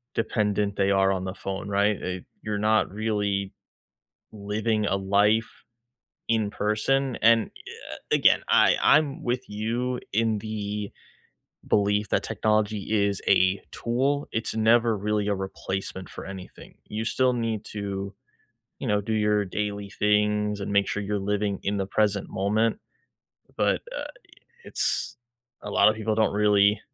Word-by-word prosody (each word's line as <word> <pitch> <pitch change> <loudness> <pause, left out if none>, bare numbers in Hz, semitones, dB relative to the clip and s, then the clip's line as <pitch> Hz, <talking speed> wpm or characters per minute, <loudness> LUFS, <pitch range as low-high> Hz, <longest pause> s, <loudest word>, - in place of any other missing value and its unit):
dependent 105 -2 0
they 100 0 +2
are 95 0 +3
on 95 -1 -1
the 95 - -4
phone, 95 0 -5
right? 100 +1 +2
It 90 0 -4 0.2
You're 105 -1 -2
not 110 -1 +2
really 105 -2 -1 0.8
living 105 +1 -1
a 100 - +1
life 105 +3 +1 0.6
in 110 -3 +1
person, 120 +6 0
and 115 0 +5
i - - -14
uh, - - -9 0.2
again, - - +5
I - - +5
I'm 150 +1 +3
with 125 +1 -1
you 115 +4 -2
in 110 0 +1
the 105 -1 -4 0.8
belief 105 0 +2
that - - +1
technology 105 -1 0 0.2
is 100 -1 -2
a 95 +1 +4
tool, 135 +5 -1
it's 110 - -3
never 115 0 +4
really 105 0 -1
a 100 - +1
replacement 95 -1 -5
for - - -9
anything, 95 -1 -10
you 110 +1 -3
still 130 +2 +2
need 115 -3 -2
to, 100 -1 -4 0.7
you - - -5
know, 105 -1 +2
do 105 +2 -4
your 105 -1 +2
daily 100 +1 -4
things 105 0 +1
and 100 +1 -4
make 100 -1 +3
sure 105 - -2
you're 105 +1 -2
living 100 0 -1
in 100 +1 0
the 95 - -1
present 105 -1 0
moment, 110 - +1 0.8
but, - - +2 0.2
uh, - - -2
i - - -6 0.6
it's - - -1 0.5
a 105 - -5
lotta 105 - +5
people 110 0 -2
don't 110 -1 +2
really, 105 0 +4
105 Hz, 150 wpm, -26 LUFS, 100-110 Hz, 0.8 s, and